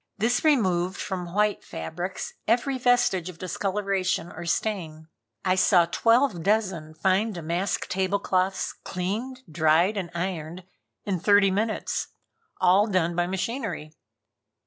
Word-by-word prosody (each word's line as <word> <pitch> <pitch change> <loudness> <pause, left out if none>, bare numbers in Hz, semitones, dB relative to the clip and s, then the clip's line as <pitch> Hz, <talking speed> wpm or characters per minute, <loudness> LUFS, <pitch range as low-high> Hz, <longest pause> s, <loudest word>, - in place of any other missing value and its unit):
This 230 +4 +1
removed 190 - +2
from 180 -3 -4
white 210 0 +1
fabrics 175 - -5
every 250 +4 +1
vestige 245 -8 +2
of 180 - -10
discoloration 190 -1 -1
or 170 +1 -8
stain. 160 -4 -2 0.4
I 185 - +3
saw 185 -2 +4
twelve 230 +2 +2
dozen 185 -6 0
fine 195 +6 +1
damask 175 +2 -2
table 190 +1 0
cloths 190 -1 0
cleaned, 225 +9 -4
dried 160 +5 +2
and 180 -3 -3
ironed 175 -1 -4 0.4
in 190 -3 -1
thirty 200 +1 +4
minutes. 215 +3 -1 0.5
All 190 +4 +4
done 175 -4 +1
by 175 0 +1
machinery. 190 - -3
185 Hz, 125 wpm, -26 LUFS, 175-210 Hz, 0.5 s, saw